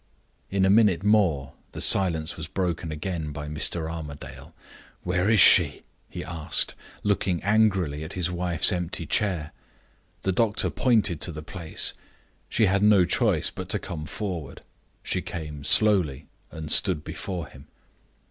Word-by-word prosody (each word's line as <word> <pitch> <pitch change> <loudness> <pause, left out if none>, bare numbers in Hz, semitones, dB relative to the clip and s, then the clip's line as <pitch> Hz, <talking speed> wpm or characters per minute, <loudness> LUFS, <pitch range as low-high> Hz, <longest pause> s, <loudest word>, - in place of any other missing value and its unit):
In 95 -1 +1
a - - +3
minute 100 -5 +3
more 90 -11 +2 0.2
the - - -7
silence 85 -4 +1
was 80 -2 -7
broken 85 -2 -3
again 75 0 -4
by 75 0 -7
Mr. 80 +2 -1
Armadale. 80 -3 -8 0.5
"Where 90 +2 0
is 110 -2 +4
she?" - - +6 0.3
he - - -7
asked, 85 -1 -1 0.3
looking 95 -4 0
angrily 95 -8 +1
at 80 - -8
his 90 -1 -2
wife's 90 0 +2
empty 90 -2 -3
chair. 85 -2 0 0.7
The 95 - +1
doctor 105 +2 +1
pointed 110 - +1
to 90 - +2
the 75 -1 -8
place. 85 0 -2 0.6
She 110 - +2
had 100 +1 +1
no 105 -3 +5
choice 90 - +1
but - - -8
to - - +1
come 75 -2 -7
forward. 90 -6 -6 0.4
She - - -1
came 75 -3 -7
slowly 85 -9 +3 0.2
and 80 -1 -6
stood 90 -7 +4
before 90 -3 -5
him. 70 +3 -15
85 Hz, 145 wpm, -25 LUFS, 80-95 Hz, 0.7 s, she